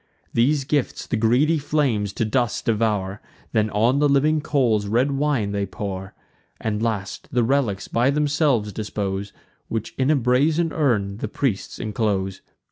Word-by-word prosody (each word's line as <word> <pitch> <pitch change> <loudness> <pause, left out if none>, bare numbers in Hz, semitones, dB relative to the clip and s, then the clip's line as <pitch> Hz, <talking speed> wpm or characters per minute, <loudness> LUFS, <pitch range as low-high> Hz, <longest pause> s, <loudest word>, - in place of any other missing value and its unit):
These 135 +5 +2
gifts 145 0 -1
the - - -2
greedy 125 +9 +3
flames 135 -9 0
to 115 - -1
dust 120 +1 0
devour; 105 -3 0 0.3
Then 110 -2 +2
on 115 +7 +2
the 145 0 +3
living 150 +3 +3
coals 120 -9 +1
red 120 +7 +2
wine 135 -7 0
they 100 -1 -1
pour; 95 -1 -6 0.4
And, 110 -1 -2
last, 110 -4 -3
the 125 -3 +2
relics 115 -6 0
by 120 +3 +2
themselves 145 -7 +1
dispose, 100 -1 -3 0.4
Which 115 -1 -4
in 130 +1 +2
a 155 - +5
brazen 145 +6 +2
urn 105 -10 +1
the 110 - -3
priests 115 -3 -2
inclose. 100 -3 -1
115 Hz, 150 wpm, -23 LUFS, 105-140 Hz, 0.4 s, a